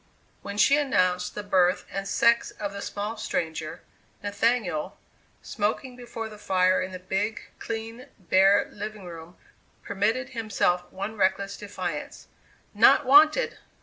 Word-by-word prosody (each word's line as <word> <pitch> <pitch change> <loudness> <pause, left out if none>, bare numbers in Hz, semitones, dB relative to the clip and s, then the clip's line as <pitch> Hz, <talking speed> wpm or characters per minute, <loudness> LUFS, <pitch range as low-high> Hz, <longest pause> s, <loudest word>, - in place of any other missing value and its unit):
When 200 0 -7
she 280 +6 +5
announced 185 -11 +1
the 210 - -4
birth 185 -3 +2
and 195 0 -4
sex 235 +3 +3
of 200 -1 -6
the 200 - -6
small 210 +3 -4
stranger, 160 -6 -4 0.4
Nathaniel, 205 -5 -1 0.5
smoking 235 +4 -2
before 235 -2 -7
the 210 -1 -12
fire 185 -2 +2
in 185 +1 -4
the 185 - -6
big, 195 +4 -2 0.2
clean, 230 +2 -6
bare, 190 +1 +4
living 210 -1 -7
room, 170 0 -10 0.5
permitted 220 +6 -1
himself 215 -7 -1
one 200 +3 -5
reckless 195 +1 0
defiance: 185 -6 -6 0.5
"Not 295 - +5
wanted!" 305 - +5
205 Hz, 130 wpm, -26 LUFS, 185-225 Hz, 0.5 s, she